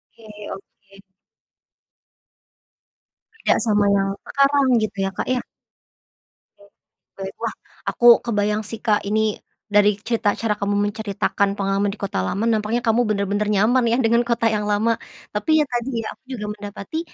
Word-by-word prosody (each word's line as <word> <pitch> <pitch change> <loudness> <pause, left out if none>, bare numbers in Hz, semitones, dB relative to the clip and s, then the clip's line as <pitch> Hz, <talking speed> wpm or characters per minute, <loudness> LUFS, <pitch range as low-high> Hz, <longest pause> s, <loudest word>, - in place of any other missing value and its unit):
Oke 225 -1 -16 0.3
oke. 195 0 -15 2.4
Beda - - +3
sama 210 -2 +3
yang 195 -1 +2 0.2
sekarang 280 0 +3 0.2
gitu 215 -1 -3
ya, 195 - -2
Kak, - - -3
ya? 255 -1 0 1.2
Oke, 200 0 -20 0.5
baik. 195 0 -5
Wah, - - -2 0.3
aku 240 - +1 0.2
kebayang 210 -1 0
sih, 220 +2 -7
Kak, 215 -3 +1
ini 215 +1 +1 0.3
dari 205 -1 +3
cerita 225 -3 +1
cara 220 -2 0
kamu 205 0 -1
menceritakan 200 -1 -1
pengalaman 195 +1 0
di 200 - -8
kota 195 - -2
lama, 195 - -2
nampaknya 220 +1 +1
kamu 230 +2 +3
bener-bener 205 0 0
nyaman 225 +5 +3
ya, 235 - +3
dengan 235 -1 +3
kota 235 -1 0
yang 210 -1 -1
lama. 220 +3 +2 0.4
Tapi, 210 +9 -2
ya - - +3
tadi 245 +1 -3
ya, - - -5
aku - - -38
juga 210 -1 -5
mendapati 205 +7 -7
210 Hz, 150 wpm, -22 LUFS, 200-230 Hz, 2.4 s, Beda